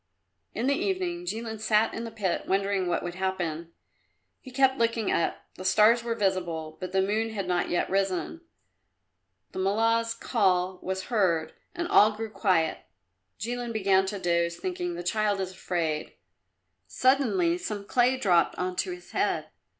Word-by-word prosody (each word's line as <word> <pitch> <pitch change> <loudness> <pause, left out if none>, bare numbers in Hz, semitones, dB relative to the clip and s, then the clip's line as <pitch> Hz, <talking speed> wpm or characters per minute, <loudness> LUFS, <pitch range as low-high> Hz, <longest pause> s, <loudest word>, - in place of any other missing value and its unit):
In 240 - -1
the 280 - +3
evening 355 0 -2
Jilin 225 -3 -4
sat 220 0 +2
in 230 - -4
the - - -5
pit 205 -5 -2
wondering 195 -1 +1
what 175 - 0
would 175 - -4
happen. 175 -3 -3 0.7
He 260 - -12
kept 265 0 +2
looking 230 -2 +1
up; 170 - 0
the 185 - -7
stars 215 +5 +5
were 235 -1 -2
visible, 175 -6 -1
but 185 -1 -5
the 190 0 +2
moon 215 +3 0
had 200 -3 -3
not 180 -1 0
yet 175 - 0
risen. 195 - -1 1.1
The - - -6
Mullah's 230 +4 +1
call 185 -6 +1
was 190 0 -3
heard, 185 -9 +1 0.2
and 345 0 -2
all 215 -9 +6
grew 220 0 -6
quiet. 180 -7 +1 0.6
Jilin 240 +2 -3
began 195 -3 +2
to 200 +1 -3
doze, 170 -2 0
thinking 175 -1 -3
"The 175 - -5
child 205 +2 0
is 190 -1 -3
afraid." 170 -4 -2 0.7
Suddenly 335 +7 +2
some 210 - -5
clay 250 +4 +2
dropped 180 -9 +3
on 180 0 -3
to - - 0
his 360 0 -8
head. - - 0
200 Hz, 160 wpm, -27 LUFS, 180-230 Hz, 1.1 s, all